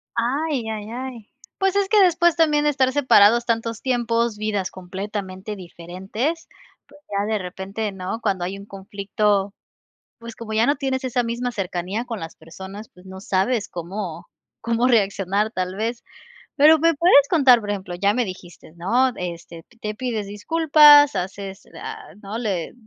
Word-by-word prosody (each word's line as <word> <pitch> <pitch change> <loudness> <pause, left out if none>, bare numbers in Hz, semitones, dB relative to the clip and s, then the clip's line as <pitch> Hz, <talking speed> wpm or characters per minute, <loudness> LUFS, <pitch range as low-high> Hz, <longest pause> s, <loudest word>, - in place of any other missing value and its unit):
Ay, 260 +1 -1
ay, 215 -1 -5
ay. 245 -3 -7 0.3
Pues 385 -1 +1
es 400 -1 +2
que 425 -1 +5
después 345 -2 +3
también 305 -3 +3
de - - +4
estar 260 -2 +1
separados 240 -4 +5
tantos 230 -1 -2
tiempos, 235 -3 0
vidas 210 -3 -2
completamente 190 +2 -6
diferentes, 190 - -5 0.4
pues 290 +1 -19
ya 200 0 0
de 215 - +1
repente, 195 +3 -5
¿no? 190 +3 -5
Cuando 195 -5 -1
hay 190 +3 -4
un 200 - -11
conflicto, 200 0 -1 0.7
pues, 230 -1 -10
como 225 -2 -8
ya 220 +2 +3
no 285 - +2
tienes 265 -1 -2
esa 250 -1 0
misma 240 +2 -2
cercanía 195 +1 -3
con 230 -4 -6
las 165 0 -8
personas, 190 +6 -10
pues, 180 - -19
no 190 0 -9
sabes 200 +4 0
cómo, 175 0 -6 0.3
cómo 230 +1 0
reaccionar 200 -3 +1
tal 185 -3 -3
vez. 230 +3 -3 0.5
Pero 310 +2 +7
me 330 +2 +3
puedes 285 -3 +5
contar, 265 -8 +5
por 205 -1 -5
ejemplo, 190 -3 -4
ya 200 +3 +2
me 250 - +1
dijiste, 180 -5 -10
¿no? 245 +9 +2
Este, 170 -2 -7 0.2
te 210 0 -4
pides 225 -3 -3
disculpas 295 +5 +6
haces, 195 +1 -5 0.2
a 440 -2 -8
¿no? 205 +3 -5
Le 195 -8 -3
215 Hz, 165 wpm, -22 LUFS, 195-260 Hz, 0.7 s, Pero